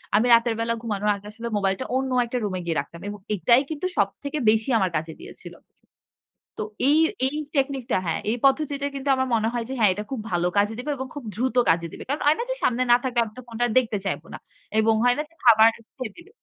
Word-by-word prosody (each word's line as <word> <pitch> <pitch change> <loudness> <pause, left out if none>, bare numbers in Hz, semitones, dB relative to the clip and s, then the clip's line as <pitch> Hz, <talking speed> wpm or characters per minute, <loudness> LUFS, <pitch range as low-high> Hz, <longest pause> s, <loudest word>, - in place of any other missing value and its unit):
আমি 215 +3 +4
রাতের 230 0 +4
বেলা 230 0 0
ঘুমানোর 210 -3 -1
আগে 200 0 -12
আসলে 230 +2 -7
মোবাইলটা 195 -1 -1
অন্য 265 0 0
একটা 235 +2 -3
রুমে 185 -2 -3
গিয়ে 165 -1 -1
রাখতাম 170 +4 -7
এবং 205 0 -6 0.2
এটাই 235 +8 +4
কিন্তু 315 +3 -4
সবথেকে 275 +9 -1
বেশি 220 +3 +2
আমার 190 -4 +1
কাজে 160 +1 -2
দিয়েছিল। - - -11 1.1
তো - - -2 0.3
এই, 300 - +5 0.3
এই 275 +3 -2 0.2
টেকনিকটা 270 -4 0
হ্যাঁ, 165 - -1
এই 235 - 0
পদ্ধতিতে 280 0 +2
কিন্তু 275 0 -4
আমার 260 0 0
মনে 225 -1 +1
হয় 240 -1 -2
যে, 265 - -2
হ্যাঁ, 215 -4 +5
এটা 210 +2 -5
খুব 265 - -3
ভালো 175 0 +1
কাজে 205 +2 +2
দিবে 265 +4 -4
এবং 265 0 -5
খুব 290 -4 -7
দ্রুত 250 +4 -1
কাজে 170 0 +1
দিবে। - - -9
কারণ 285 +3 -2
হয় 300 +2 +5
না - - -1
যে - - 0
সামনে 250 +1 +2
না - - +9
থাকলে 245 -2 +1
আমি 215 - -11
তো - - -7
ফোনটা 240 +1 -1
দেখতে 225 -5 0
চাইব 190 -5 -2
না - - -6 0.4
এবং 220 0 +3
হয় 245 0 +5
না - - +1
যে - - -27
খাবার 225 -2 +7 0.3
খেয়ে 250 -6 -5
দিল। 345 - -14
230 Hz, 230 wpm, -24 LUFS, 205-265 Hz, 1.1 s, না